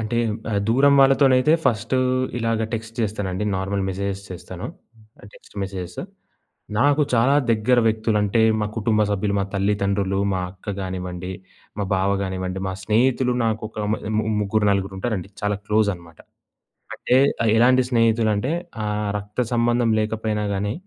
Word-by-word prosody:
అంటే 110 Hz, +1 st, -2 dB, 0.3 s
ఆహ్, 100 Hz, -2 st, 0 dB
దూరం 140 Hz, +4 st, +5 dB
వాళ్ళతోనైతే 135 Hz, +1 st, +5 dB
ఫస్టు 115 Hz, +1 st, +1 dB, 0.4 s
ఇలాగ 115 Hz, -1 st, 0 dB
టెక్స్ట్ 115 Hz, 0 st, -6 dB
చేస్తానండి. 105 Hz, -3 st, -2 dB
నార్మల్ 95 Hz, +1 st, -2 dB
మెసేజెస్ 100 Hz, +1 st, -3 dB
చేస్తాను. 90 Hz, +3 st, -7 dB, 0.7 s
Text -, -, -19 dB
messages. 95 Hz, -2 st, -5 dB, 0.8 s
నాకు 145 Hz, +3 st, +4 dB
చాలా 125 Hz, +4 st, +4 dB, 0.2 s
దగ్గర 115 Hz, +3 st, +3 dB
వ్యక్తులంటే 110 Hz, -1 st, +1 dB, 0.2 s
మా 105 Hz, -, 0 dB
కుటుంబ 110 Hz, 0 st, +1 dB
సభ్యులు, 100 Hz, 0 st, 0 dB
మా -, -, 0 dB
తల్లిదండ్రులు, 100 Hz, -1 st, 0 dB
మా 95 Hz, -, -1 dB
అక్క 100 Hz, +2 st, -7 dB
గానివ్వండి, 90 Hz, -1 st, -5 dB, 0.5 s
మా 100 Hz, -, 0 dB
బావ 95 Hz, +1 st, +1 dB
గానివ్వండి 95 Hz, 0 st, -3 dB
మా -, -, -3 dB
స్నేహితులు 125 Hz, +5 st, +2 dB
నాకు 110 Hz, -1 st, -1 dB
ఒక -, -, -25 dB, 0.2 s
మ -, -, +1 dB, 0.2 s
ము 110 Hz, -, +1 dB, 0.2 s
ముగ్గురు, 105 Hz, +1 st, +1 dB
నలుగురుంటారండి 100 Hz, 0 st, -2 dB
చాలా 105 Hz, 0 st, 0 dB
క్లోజనమాట. 100 Hz, -7 st, -1 dB, 0.8 s
అంటే 125 Hz, -, +2 dB, 0.3 s
ఆహ్, 110 Hz, -, +3 dB
ఎలాంటి 130 Hz, +2 st, +5 dB
స్నేహితులంటే, 115 Hz, 0 st, +2 dB, 0.3 s
ఆహ్, 105 Hz, 0 st, -2 dB
రక్త 105 Hz, +4 st, -4 dB
సంబంధం 120 Hz, 0 st, +2 dB
లేకపోయినా 110 Hz, -1 st, -1 dB
గానీ, 100 Hz, +2 st, -1 dB
105 Hz, 135 wpm, -22 LUFS, 95-115 Hz, 0.8 s, దూరం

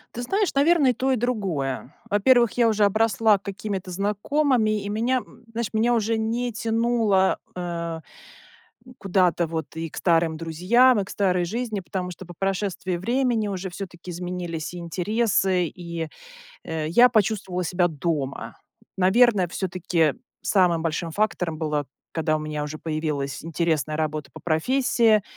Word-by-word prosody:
Ты 240 Hz, -, -4 dB
знаешь, 390 Hz, -, 0 dB
наверное, 285 Hz, -1 st, +4 dB
и -, -, -2 dB
то 265 Hz, +3 st, 0 dB
и -, -, +3 dB
другое. 185 Hz, -, -2 dB, 0.2 s
Во-первых, 235 Hz, +3 st, +4 dB
я 235 Hz, -1 st, +5 dB
уже 215 Hz, -2 st, +2 dB
обросла 215 Hz, 0 st, +3 dB
какими-то 200 Hz, -1 st, -5 dB
знакомыми, 215 Hz, +3 st, +1 dB
и 200 Hz, -, -4 dB
меня, 240 Hz, +5 st, +1 dB, 0.3 s
знаешь, 230 Hz, -1 st, -2 dB
меня 230 Hz, +2 st, +2 dB
уже 225 Hz, -1 st, +1 dB
не 230 Hz, +2 st, -1 dB
тянуло, 225 Hz, -3 st, +2 dB, 0.2 s
э, 170 Hz, -2 st, -4 dB, 1.0 s
куда-то 180 Hz, -3 st, +2 dB
вот 160 Hz, 0 st, -5 dB
и 165 Hz, 0 st, -4 dB
к -, -, -11 dB
старым 165 Hz, -2 st, +2 dB
друзьям, 200 Hz, +9 st, +3 dB
и -, -, -2 dB
к 190 Hz, -, -12 dB
старой 185 Hz, -3 st, +1 dB
жизни, 220 Hz, +2 st, -3 dB
потому 180 Hz, 0 st, -4 dB
что 180 Hz, +2 st, -10 dB
по 175 Hz, -, -10 dB
прошествии 190 Hz, 0 st, -2 dB
времени 230 Hz, +2 st, 0 dB
уже 190 Hz, -1 st, -4 dB
всё-таки 180 Hz, -1 st, -8 dB
изменились 175 Hz, -2 st, -4 dB
интересы, 185 Hz, +1 st, 0 dB
и, 170 Hz, 0 st, -6 dB, 0.6 s
э, 160 Hz, -1 st, -3 dB
я 240 Hz, +9 st, +6 dB
почувствовала 200 Hz, -5 st, 0 dB
себя 175 Hz, +1 st, +1 dB
дома. 150 Hz, -3 st, -3 dB, 0.4 s
Наверное, 195 Hz, 0 st, +4 dB
всё-таки 175 Hz, -3 st, 0 dB, 0.3 s
самым 175 Hz, -5 st, +3 dB
большим 165 Hz, 0 st, -2 dB
фактором 180 Hz, -5 st, -1 dB
было, 150 Hz, -3 st, -2 dB, 0.2 s
когда 155 Hz, -1 st, 0 dB
у -, -, -1 dB
меня 150 Hz, -1 st, -3 dB
уже 150 Hz, +1 st, -5 dB
появилась 155 Hz, -3 st, -3 dB
интересная 160 Hz, -2 st, -1 dB
работа 155 Hz, -1 st, -2 dB
по -, -, -11 dB
профессии, 220 Hz, +4 st, +2 dB
185 Hz, 145 wpm, -24 LUFS, 165-225 Hz, 1.0 s, я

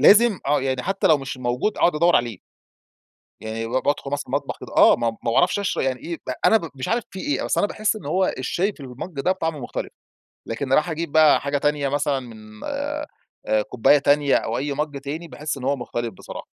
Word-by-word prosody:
لازم 215 Hz, -1 st, +6 dB
آه، 145 Hz, 0 st, +3 dB
يعني 130 Hz, -1 st, -1 dB
حتى 195 Hz, +1 st, 0 dB
لو 155 Hz, -2 st, +5 dB
مش 135 Hz, -1 st, -6 dB
موجود 125 Hz, -, -1 dB
أقعد 175 Hz, -, +3 dB
أدور 170 Hz, +3 st, +4 dB
عليه. 120 Hz, -1 st, -1 dB, 1.0 s
يعني 110 Hz, +1 st, -4 dB
ب -, -, -8 dB
بادخل 135 Hz, +2 st, 0 dB
مثلًا 145 Hz, 0 st, -2 dB
المطبخ 140 Hz, +2 st, -2 dB
كده -, -, -10 dB
آه، -, -, +8 dB
ما 115 Hz, -1 st, 0 dB
ما 115 Hz, +1 st, -4 dB
باعرفش 175 Hz, -, +3 dB
اشر 200 Hz, -, -1 dB
يعني 130 Hz, -2 st, -1 dB
إيه، 170 Hz, -1 st, -5 dB, 0.3 s
أنا 225 Hz, -, +6 dB
ب 165 Hz, -6 st, -7 dB
مش 130 Hz, -, -5 dB
عارف 235 Hz, 0 st, 0 dB
في 190 Hz, -, -7 dB
إيه؟ 290 Hz, +9 st, -1 dB
بس -, -, -1 dB
أنا 205 Hz, -, +3 dB
باحس 215 Hz, +1 st, 0 dB
إن 190 Hz, -9 st, -9 dB
هو 185 Hz, +5 st, +1 dB
الشاي 180 Hz, +10 st, -1 dB
في -, -, -23 dB
المج 140 Hz, +4 st, -7 dB
ده 185 Hz, -, +2 dB
طعمه 160 Hz, -5 st, -2 dB
مختلف، 120 Hz, -, -5 dB, 0.5 s
لكن 115 Hz, +5 st, -3 dB
إني 130 Hz, -, -1 dB
أروح 155 Hz, +3 st, +2 dB
أجيب 165 Hz, -1 st, -3 dB
بقى 155 Hz, -2 st, +6 dB
حاجة 140 Hz, 0 st, -1 dB
تانية 145 Hz, -1 st, 0 dB
مثلًا 145 Hz, 0 st, 0 dB
من 110 Hz, -3 st, -12 dB
آآ، -, -, -3 dB, 0.6 s
كوباية 125 Hz, +5 st, +4 dB
تانية 145 Hz, 0 st, +3 dB
أو 115 Hz, -, 0 dB
أي 145 Hz, +1 st, -2 dB
مج، 145 Hz, 0 st, -3 dB
تاني 155 Hz, +5 st, -5 dB
باحس 150 Hz, -2 st, -4 dB
إن 130 Hz, -, -8 dB
هو 140 Hz, +2 st, +1 dB
مختلف 120 Hz, -2 st, -4 dB
بصراحة. -, -, -9 dB
145 Hz, 220 wpm, -23 LUFS, 130-170 Hz, 1.0 s, آه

